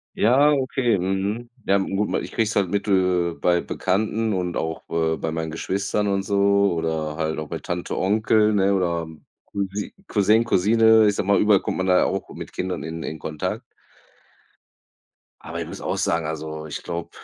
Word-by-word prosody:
Ja, 135 +7 +4
okay. 130 -5 +1
Mhm. 95 +6 -2 0.2
Ja, 100 - +3
n 95 0 -2
gut, 105 +1 0
ich - - -8
krieg's 115 -1 0
halt 95 -3 +2
mit, 100 +2 -1
äh, 90 -3 +2
bei 85 +1 +2
Bekannten 110 +3 -1
und 90 -2 -2
auch, 80 0 -3
äh, 80 -1 +1
bei 80 0 -3
meinen 80 0 -3
Geschwistern 100 +5 -1
und 100 0 0
so 100 -1 +3
oder 80 -2 -2
halt 80 0 -2
auch 80 - -5
bei - - -5
Tante, 90 0 -4
Onkel, 110 +2 +3
ne, 100 0 +3
oder 85 -3 0 0.4
Cousin 100 +1 -4
Cousin, 105 +2 +3
Cousine, 110 +1 +4
ich 105 - +2
sage 95 - -2
mal, 100 - +4
überall 105 -2 +4
kommt - - -3
man 95 - -1
da 90 -1 +4
auch - - -2
mit - - -8
Kindern 90 0 -3
in 80 0 -5
in 80 - -5
Kontakt. 75 0 -4 1.8
Aber - - -6
ich - - -4
muss - - -8
auch - - -2
sagen, 80 -1 0
also, 80 0 -5
ich 75 - -6
glaube, 85 0 -5
95 Hz, 185 wpm, -23 LUFS, 85-105 Hz, 1.8 s, Ja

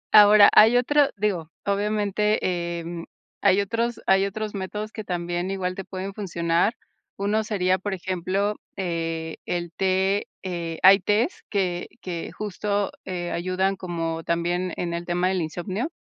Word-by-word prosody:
Ahora, 210 0 +9
hay 225 +3 +7
otro 285 +3 +3
digo, 185 -6 -1 0.2
obviamente, 200 -4 0
em, 170 0 -6 0.4
hay 200 0 +4
otros 230 +3 -1
hay 195 +1 +4
otros 215 +1 -4
métodos 210 +2 -4
que 215 - -6
también, 175 0 -2
igual 185 -2 -2
te 195 - -6
pueden 190 +1 -5
funcionar. 175 +1 0 0.4
Uno 205 +2 +1
sería, 190 -3 +1
por 195 +1 -3
ejemplo, 190 +3 -1 0.2
eh, 165 -3 -3
el 175 -1 -2
té, 190 +2 +1 0.2
eh, 170 -3 -4
hay 195 +2 +9
tés 210 - 0
que 180 -4 -1
que 170 -3 -5
justo, 205 0 -2
eh, 175 -2 -4
ayudan 185 +2 0
como 165 -3 -3
también 175 +2 -1
en 170 -1 -2
el 170 0 -4
tema 180 +1 +1
del 190 -1 0
insomnio, 185 - -3
190 Hz, 145 wpm, -24 LUFS, 175-205 Hz, 0.4 s, Ahora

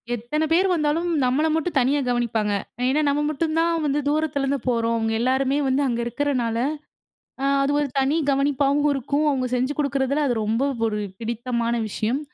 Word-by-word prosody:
எத்தன 240 +7 -2
பேர் 365 +4 +4
வந்தாலும் 325 0 +1 0.2
நம்மள 260 +5 +2
மட்டும் 320 0 -1
தனியா 270 +3 +2
கவனிப்பாங்க. 230 -3 0 0.4
ஏன்னா 280 +4 +2
நம்ம 285 +1 +1
மட்டும் 310 +1 -1
தான் 335 0 +1
வந்து 290 0 +1
தூரத்திலருந்து 280 -2 0
போறோம் 230 -2 +1
அவங்க 225 0 -1
எலலாருமே 265 +3 +1
வந்து 265 +2 +1
அங்க 240 -3 -1
இருக்கிறனால 240 -2 -1 0.9
ஆ - - +2 0.2
அது 275 - +1
ஒரு 295 - 0
தனி 270 +4 +2
கவனிப்பாவும் 280 +1 +2
இருக்கும். 280 +3 -1
அவங்க 260 -3 0
செஞ்சு 255 +3 0
குடுக்குறதில 280 0 0
அது 245 - 0
ரொம்ப 220 +3 0 0.2
ஒரு 210 -1 -1 0.2
பிடித்தமான 235 +1 -2
விஷயம். 220 +5 -1
275 Hz, 160 wpm, -23 LUFS, 240-295 Hz, 0.9 s, பேர்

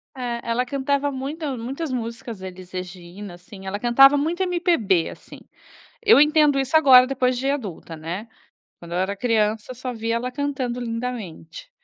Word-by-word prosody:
É, 240 -2 -3
ela 235 +2 0
cantava 280 +1 0
muita 275 +1 -4
muitas 270 +6 -5
músicas 230 -4 -5
Elis 185 -1 -9
Regina, 180 +1 -8
assim, 190 +2 -13
ela 205 +2 -4
cantava 270 +4 +6
muito 335 +6 -1
MPB, 335 - +1
assim. - - -12 0.6
Eu 435 -8 +7
entendo 300 -1 +4
isso 270 +4 -2
agora, 255 -5 +8
depois 255 -1 0
de 270 +2 -1
adulta, 200 - -5
né, 170 +8 -6 0.5
quando 170 0 -11
eu - - 0
era 195 +2 -1
criança, 220 +1 0
só 250 +1 -5
via 230 0 -2
ela 250 +2 -3
cantando 260 -3 -3
lindamente. 230 - -6
245 Hz, 155 wpm, -23 LUFS, 200-275 Hz, 0.6 s, agora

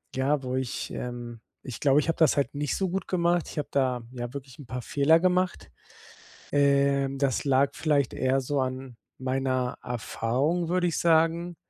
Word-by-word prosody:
ja, 135 +2 +1
wo 130 0 -3
ich, 130 -2 -3
ähm 120 -2 -6 0.2
ich 130 - -7
glaube, 140 0 +4
ich 150 - -1
habe 165 - +1
das 160 -3 +4
halt 140 0 0
nicht 145 0 -1
so 190 - 0
gut 190 +2 -3
gemacht. 175 -1 +1
Ich - - -10
habe 145 - -3
da, 130 -3 +1
ja, 120 -1 -5
wirklich 135 -2 -9
'n 140 - -11
paar 125 0 -4
Fehler 155 +6 +4
gemacht. 185 0 0 0.8
Ähm, 140 -1 +2
das 135 0 0
lag 140 0 +3
vielleicht 145 -4 +1
eher 130 +1 +1
so 135 +1 -1
an 130 -1 -4 0.2
meiner 130 -1 -1
Erfahrung 130 +8 -1
würde 180 +1 +1
ich 165 - -2
sagen. 165 +1 +2
140 Hz, 180 wpm, -27 LUFS, 130-160 Hz, 0.8 s, glaube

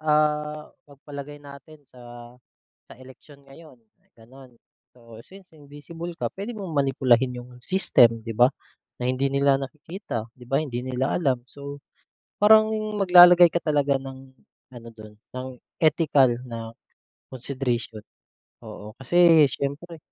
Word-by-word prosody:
ah, 150 0 -1 0.2
pagpalagay 145 0 -10
natin 145 +1 -15
sa 120 -1 -13 0.6
sa - - -13
eleksyon 130 +2 -17
ngayon 140 +1 -16 0.4
gano'n. 125 +2 -17 0.4
So, 115 -2 -15
since 190 -1 -17
invisible 160 +3 -10
ka, - - -3
pwede 205 +5 -7
mong 195 -4 -7
manipulahin 130 -3 +1
yung 120 +1 -14
system, 120 -9 +2
'di 115 - -5
ba? 120 +3 +4 0.5
Na 125 - -6
hindi 130 +2 -1
nila 140 0 +2
nakikita, 145 - -7
'di 125 0 -16
ba? 135 +4 +1
Hindi 120 -5 -5
nila 130 +1 -2
alam. 130 -7 -1
So, 140 +2 -10 0.6
parang 215 +1 +6 0.3
maglalagay 180 -2 +8
ka 170 - -2
talaga 145 -3 +1
ng 135 0 -10 0.5
ano 120 -2 -13
dun, 110 -1 -14 0.2
ng 130 0 -6 0.3
ethical 150 -6 +3
na 115 -2 -7 0.6
consideration. 120 -4 -4 0.6
Oo. 105 +1 -11
Kasi 165 +3 +4
siyempre, 150 +5 -5
140 Hz, 130 wpm, -24 LUFS, 125-155 Hz, 0.6 s, maglalagay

